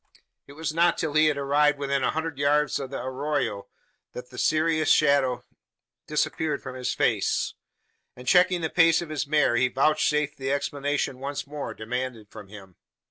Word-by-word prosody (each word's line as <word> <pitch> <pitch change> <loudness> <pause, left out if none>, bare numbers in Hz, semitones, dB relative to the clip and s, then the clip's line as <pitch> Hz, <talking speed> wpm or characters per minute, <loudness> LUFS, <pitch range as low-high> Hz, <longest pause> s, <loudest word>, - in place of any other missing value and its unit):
It 140 - -12
was 155 +1 -4
not 170 +1 +3
till 155 -2 -2
he 155 +1 +4
had 150 -2 +1
arrived 145 +1 +2
within 140 -1 -1
a - - +2
hundred 160 -3 -3
yards 145 +1 +2
of 135 -2 -5
the 140 - -5
arroyo 130 -6 -2 0.5
that 125 +1 -9
the 125 - -8
serious 155 0 +1
shadow 140 -4 +3 0.6
disappeared 150 -3 -1
from 130 - -7
his 130 -1 -3
face; - - 0 0.6
and, 125 0 -13
checking 180 +2 +4
the 160 - -2
pace 165 -1 +4
of 165 - -10
his 150 -2 -3
mare, 150 -5 +2
he 125 - +3
vouchsafed 150 +2 +1
the 135 0 -2
explanation 140 -1 -2
once 140 +1 -4
more 145 0 -6
demanded 120 -1 -5
from 100 - -11
him. 95 -3 -13
145 Hz, 175 wpm, -25 LUFS, 130-155 Hz, 0.6 s, he